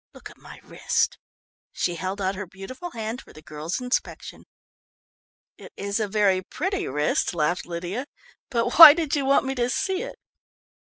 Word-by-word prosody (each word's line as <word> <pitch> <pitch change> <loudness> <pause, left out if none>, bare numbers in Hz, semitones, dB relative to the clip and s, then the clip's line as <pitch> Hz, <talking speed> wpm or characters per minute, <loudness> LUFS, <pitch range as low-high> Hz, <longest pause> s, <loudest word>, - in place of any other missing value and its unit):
Look - - -11
at - - -19
my - - -13
wrist!" - - -1 0.5
She 175 - -2
held 185 +4 -5
out 190 -1 -1
her 200 0 -7
beautiful 225 - -9
hand 225 -2 -5
for - - -18
the 155 - -14
girl's 155 - -5
inspection. 250 0 -4 1.1
"It - - -13
is 200 +2 -2
a 215 - -1
very 195 -2 +2
pretty 375 - -3
wrist," 150 +5 -1
laughed 170 +3 -1
Lydia, 175 +10 -5 0.4
"but 240 +2 -1
why 300 -3 +13
did 320 -3 -1
you 280 -2 -1
want 275 0 +3
me 265 - -2
to 245 -2 -1
see 380 +8 -1
it?" - - -7
215 Hz, 170 wpm, -24 LUFS, 185-270 Hz, 1.1 s, why